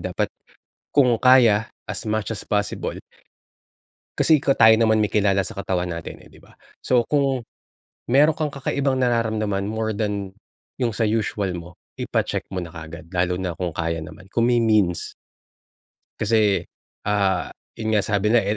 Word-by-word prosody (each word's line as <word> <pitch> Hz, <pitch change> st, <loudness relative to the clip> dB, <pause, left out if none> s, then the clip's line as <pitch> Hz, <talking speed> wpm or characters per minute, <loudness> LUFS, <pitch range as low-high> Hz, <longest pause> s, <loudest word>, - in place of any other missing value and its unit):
Dapat -, -, -2 dB, 0.6 s
kung 130 Hz, -4 st, +4 dB
kaya, 120 Hz, -4 st, +5 dB, 0.2 s
as -, -, -5 dB
much 110 Hz, +1 st, -1 dB
as 100 Hz, -, -7 dB
possible. 105 Hz, -, -1 dB, 1.2 s
Kasi 155 Hz, -2 st, +4 dB
ikaw 135 Hz, -1 st, +1 dB
tayo 110 Hz, 0 st, +7 dB
naman 110 Hz, -1 st, +3 dB
may 105 Hz, -, +1 dB
kilala 100 Hz, -2 st, +2 dB
sa -, -, -9 dB
katawan 95 Hz, -2 st, -2 dB
natin 85 Hz, -1 st, -7 dB
eh, -, -, -16 dB
'di -, -, -17 dB
ba. -, -, -19 dB, 0.3 s
So, 125 Hz, -2 st, +3 dB
kung 135 Hz, -4 st, +1 dB, 0.7 s
meron 150 Hz, +3 st, +6 dB
kang 155 Hz, -2 st, -1 dB
kakaibang 135 Hz, -1 st, -1 dB
nararamdaman 110 Hz, -5 st, 0 dB
more 110 Hz, 0 st, -2 dB
than 100 Hz, -3 st, -2 dB, 0.4 s
yung 125 Hz, -3 st, 0 dB
sa 115 Hz, -, 0 dB
usual 105 Hz, -3 st, -1 dB
mo, 85 Hz, 0 st, -9 dB, 0.3 s
ipa-check -, -, -1 dB
mo 95 Hz, -, -2 dB
na 85 Hz, -, -7 dB
kaagad. 80 Hz, +1 st, -10 dB
Lalo 90 Hz, 0 st, +1 dB
na 90 Hz, -2 st, -2 dB
kung 90 Hz, -2 st, -2 dB
kaya 80 Hz, 0 st, -1 dB
naman, 85 Hz, +3 st, -11 dB
kung 115 Hz, -, +2 dB
may 120 Hz, -, +3 dB
means. 105 Hz, -7 st, +1 dB, 1.0 s
Kasi, 110 Hz, -2 st, +2 dB, 0.4 s
ah, 100 Hz, -4 st, +1 dB, 0.2 s
yun 110 Hz, 0 st, -2 dB
nga 105 Hz, -, +4 dB
sabi 100 Hz, +2 st, 0 dB
nila 120 Hz, -, +6 dB
e 105 Hz, 0 st, -1 dB
110 Hz, 160 wpm, -23 LUFS, 95-120 Hz, 1.2 s, tayo